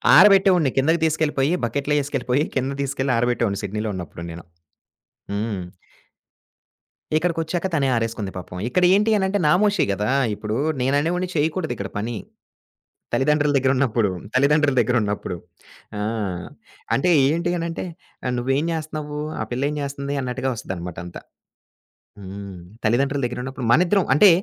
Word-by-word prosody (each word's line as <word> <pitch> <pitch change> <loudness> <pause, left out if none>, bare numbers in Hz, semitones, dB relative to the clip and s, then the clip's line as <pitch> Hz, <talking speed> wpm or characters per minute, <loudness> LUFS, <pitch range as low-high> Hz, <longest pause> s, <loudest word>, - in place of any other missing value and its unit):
ఆరబెట్టేవాడిని. 185 -5 +6
కిందకి 160 +5 +3
తీసుకెళ్ళిపోయి, 155 -2 +1
బకెట్లో 140 +5 -1
ఏసుకెళ్ళిపోయి, 135 -1 0
కిందకి 135 +1 -1
తీసుకెళ్లి 135 -1 -1
ఆరబెట్టేవాడిని 115 -4 0
సిడ్నీలో 105 +2 -2
ఉన్నప్పుడు 85 -1 -7
నేను. 85 0 -9 0.9
హ్మ్. 105 -2 -2 1.6
ఇక్కడికొచ్చాక 170 +2 -1
తనే 140 -4 +2
ఆరేసుకుంది 115 -4 -2
పాపం. 90 0 -8
ఇక్కడ 180 +8 +1
ఏంటి 210 +2 +2
అనంటే 195 +1 +1
నామోషీ 200 +6 +3
కదా! 105 +2 -1 0.3
ఇప్పుడు 105 +1 -4 0.3
నేననేవోడ్ని 160 +8 +1
చేయకూడదిక్కడ 150 - -1
పని. 115 +3 -3 1.0
తల్లిదండ్రుల 145 +1 +2
దగ్గర 130 0 +2
ఉన్నప్పుడు. 115 -5 +2 0.2
తల్లిదండ్రుల 140 +1 +3
దగ్గర 120 +2 +2
ఉన్నప్పుడు. 105 -3 -2 0.6
ఆ! - - -2 0.9
అంటే 140 +6 +2 0.2
ఏంటి 170 +4 0
అనంటే 165 +1 -3 0.5
"నువ్వెంచేస్తన్నావ్వు? 150 +3 -2 0.2
ఆ - - +1
పిల్లెంచేస్తుంది." 140 +1 -2
అన్నట్టుగా 130 +1 -2
వస్తదినమాట 90 -5 -6
అంతా. 90 - -9 1.0
హ్మ్. 100 -1 -8 0.3
తల్లిదండ్రుల 135 +5 +2
దగ్గర 120 0 -4
ఉన్నప్పుడు. 130 -1 -5
మనిద్దరం, 180 +7 +4
అంటే 195 +7 +8
135 Hz, 115 wpm, -22 LUFS, 115-155 Hz, 1.6 s, అంటే